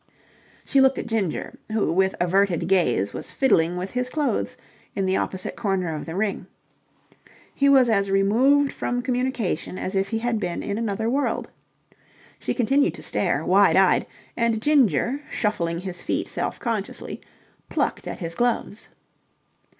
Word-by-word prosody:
She 275 - +3
looked 265 0 +4
at - - -3
Ginger, 210 -8 -2
who 215 -6 +1
with 190 +2 +2
averted 180 -1 +2
gaze 125 - +2
was - - -5
fiddling 175 -10 +2
with 185 +2 -4
his 250 0 -2
clothes 295 +1 -1 0.4
in 195 - 0
the 190 0 +1
opposite 185 -1 -3
corner 190 -6 -1
of 155 - -6
the 165 - -5
ring. 200 0 -2 1.1
He 280 0 +3
was 265 -3 +6
as 200 -3 +2
removed 250 +9 +3
from 245 0 -2
communication 250 - -2
as 185 - -4
if 195 0 0
he 225 - -1
had 230 0 -1
been 175 -4 -3
in 205 +2 -3
another 220 -1 -1
world. 275 +4 -1 0.9
She - - -2
continued 270 +3 +2
to - - -9
stare, - - -1
wide - - +5
eyed, - - +4 0.3
and 230 -2 +1
Ginger, 260 - +2
shuffling 170 -6 -1
his 185 -2 -6
feet - - -2
self - - -3
consciously, 225 -5 -4 0.5
plucked - - -1
at - - -5
his 165 -2 -5
gloves. 235 0 -1
210 Hz, 155 wpm, -24 LUFS, 185-245 Hz, 1.1 s, was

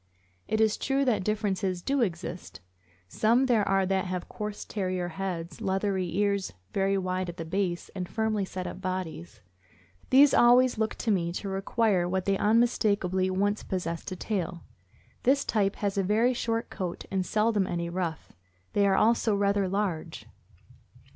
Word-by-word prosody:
It 220 - 0
is 220 -1 +3
true 275 0 0
that 225 -7 +1
differences 195 -3 -1
do 275 -1 +1
exist. 180 -3 -4 0.5
Some 230 - +2
there 230 -5 +2
are 195 0 +3
that 190 0 0
have 180 -1 -4
coarse 210 -1 -6
Terrier 185 -3 -2
heads, 175 -1 -5
leathery 190 -1 0
ears 200 -1 0 0.2
very 195 0 +1
wide 185 -1 -2
at 175 - -8
the 165 - -5
base, 180 0 -2
and 180 -2 -4
firmly 220 -2 0
set 185 -1 -5
up 185 - -6
bodies; 185 - -5 0.7
these 275 +1 +7
always 245 0 +5
look 220 0 0
to 225 - -1
me 170 -4 +1
to 195 +2 -4
require 195 -1 +1
what 190 0 -1
they 195 - +2
unmistakably 205 -4 +2
once 205 +3 0
possessed— 175 -1 -4
a - - -3
tail. 180 -3 -3 0.6
This 275 +2 +2
type 200 -3 +1
has 200 -2 -1
a - - +2
very 220 +6 +2
short 230 -1 -2
coat 180 -3 -5
and 190 -1 0
seldom 210 0 +1
any 170 -1 -2
ruff; 170 -2 -4 0.4
they 200 -1 +3
are 195 - +3
also 225 0 +3
rather 200 -1 +1
large. 195 -5 -3
195 Hz, 160 wpm, -28 LUFS, 185-215 Hz, 0.7 s, these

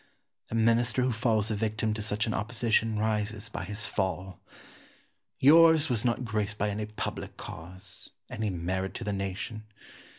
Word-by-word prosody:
A - - -3
Minister 115 +2 +3
who 130 - +2
falls 110 -2 +1
a - - 0
victim 110 +1 0
to 110 - -4
such 105 +1 0
an 110 - -1
opposition 110 +1 +1
rises 105 -1 -1
by - - -5
his 105 +2 -3
fall. 95 -1 -2 1.0
Yours 160 +2 +7
was 115 -3 +1
not 125 0 0
graced 105 -2 -1
by 105 0 0
any 105 +1 -3
public 105 - -5
cause, 90 +2 -7 0.2
any 110 -1 -2
merit 95 +2 -2
to - - -4
the 105 -2 -1
nation. 100 +3 -4
110 Hz, 160 wpm, -29 LUFS, 100-115 Hz, 1.0 s, Yours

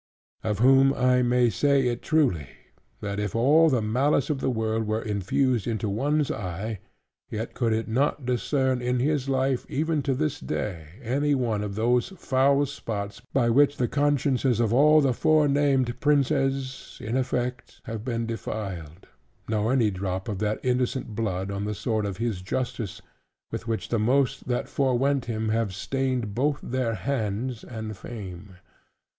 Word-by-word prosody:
Of 105 -2 -1
whom 135 +3 +5
I 125 0 +3
may 120 -1 +3
say 140 0 +2
it 120 -1 -2
truly, 130 - +1 0.5
"That 100 0 -3
if 105 -1 -2
all 150 +8 +5
the 125 -6 +1
malice 135 +6 +1
of 140 - -1
the - - +1
world 110 -2 -1
were 110 +1 -1
infused 110 +4 0
into 110 -2 -1
one 145 +9 +1
eye: 100 +4 -4 0.5
yet 110 +2 -4
could 115 -3 0
it 110 +1 0
not 135 +4 0
discern 130 +1 0
in 125 +1 0
his 140 0 0
life, 130 -1 +1
even 155 +1 0
to 135 -1 0
this 145 +1 -1
day, 85 -7 -4 0.2
any 140 +5 +1
one 115 -5 0
of 100 -1 -4
these 120 - +2
foul 140 0 +3
spots, 105 -5 -5
by 120 -3 +2
which 145 +3 +4
the 125 - +1
consciences 140 -4 +1
of 115 -1 +2
all 150 +4 +6
the 135 -3 +2
forenamed 140 -4 +2
princes 135 -2 0
(in 110 +3 -3
effect) 125 -1 -2
have 110 -2 -6
been 115 -2 -2
defiled; 100 -7 -6 0.4
nor 110 +1 0
any 120 -5 +3
drop 95 +2 -3
of 105 -4 -3
that 105 0 -1
innocent 125 -2 -1
blood 100 -3 -2
on 100 +1 -3
the 105 0 -2
sword 110 0 -1
of 95 -2 -5
his 110 -5 -2
justice, 115 +1 -4 0.5
with 115 - -5
which 115 -1 -2
the 115 - +1
most 135 +5 +1
that 125 -1 -1
fore 130 -3 +1
went 135 0 +1
him 110 -2 -2
have 110 -3 0
stained 130 -1 -2
both 140 +5 +1
their 120 -3 -1
hands 115 +1 -2
and 110 -3 -6
fame." 95 -3 -9
120 Hz, 165 wpm, -26 LUFS, 110-135 Hz, 0.5 s, all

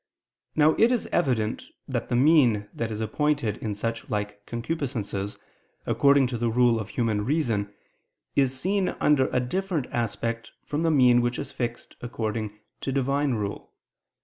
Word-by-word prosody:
Now 155 0 +5
it 230 +2 +5
is 245 -3 +1
evident 125 -10 0 0.2
that - - -3
the - - +1
mean 125 -7 +4
that 115 - -3
is 110 0 -4
appointed 140 -2 0
in 105 -2 -4
such 115 +2 -4
like 105 -1 -3
concupiscences 120 -6 -3 0.5
according 140 -1 +4
to 120 -2 -3
the 120 0 +1
rule 120 0 +3
of 110 -1 -5
human 110 -4 0
reason, 115 -7 0 0.6
is 135 -1 +2
seen 195 +2 +1
under 140 -3 +4
a 125 - 0
different 170 +3 -1
aspect 115 0 -3
from 150 +2 -2
the 165 - +2
mean 125 -5 +5
which 120 0 -1
is - - -5
fixed 120 -1 -5
according 110 -3 -3 0.2
to 135 - -3
Divine 140 0 +1
rule. 105 -2 -5
120 Hz, 155 wpm, -26 LUFS, 110-140 Hz, 0.6 s, Now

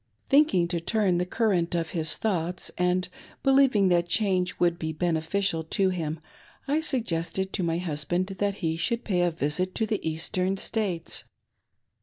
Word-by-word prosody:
" - - -41
Thinking 275 - +4
to 170 -1 -1
turn 190 0 +1
the 180 - -1
current 180 -6 +1
of 165 -2 -2
his 160 -3 +2
thoughts, 180 -4 -2
and 180 +1 +1 0.4
believing 265 -8 +4
that 175 -1 +2
change 185 -3 +1
would 170 0 +2
be 160 0 -2
beneficial 165 +2 0
to 190 +4 +2
him, 165 -3 -3 0.5
I 290 +3 +2
suggested 190 - -1
to - - -1
my 165 -1 0
hus 155 -4 -3
band 175 +5 0
that 200 +1 -2
he 165 -4 -2
should 235 +7 -1
pay 180 -4 0
a 175 - +3
visit 165 +4 -1
to 220 - +1
the 215 -2 -1
Eastern 180 +4 -1
States. 190 -5 -2
180 Hz, 170 wpm, -27 LUFS, 165-200 Hz, 0.5 s, Thinking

